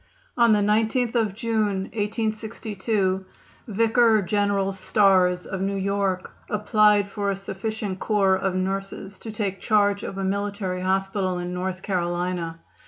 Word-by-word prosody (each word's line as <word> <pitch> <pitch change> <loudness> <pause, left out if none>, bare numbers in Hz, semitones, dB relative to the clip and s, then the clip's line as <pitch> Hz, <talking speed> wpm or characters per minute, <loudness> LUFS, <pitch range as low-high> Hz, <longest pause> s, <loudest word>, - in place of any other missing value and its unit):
On 235 -2 +5
the 210 -1 +4
19th 220 +4 +1
of 220 -5 +1
June, 215 -4 0
1862, 215 -2 -1 0.4
Vicar 225 0 +3
General 200 0 +1
Starrs, 185 -2 +3
of 190 -1 -4
New 195 +1 -1
York, 195 -1 -1 0.2
applied 210 -1 +3
for 200 -1 -2
a 200 - 0
sufficient 195 0 -4
corps 195 -3 +2
of 190 -1 -1
nurses 195 +1 -3
to 225 - -7
take 200 -3 -3
charge 205 -2 +2
of 195 - -6
a 195 - -2
military 200 -1 -2
hospital 190 0 0
in 180 0 -4
North 185 +1 -3
Carolina. 175 -2 -2
200 Hz, 135 wpm, -24 LUFS, 190-215 Hz, 0.4 s, On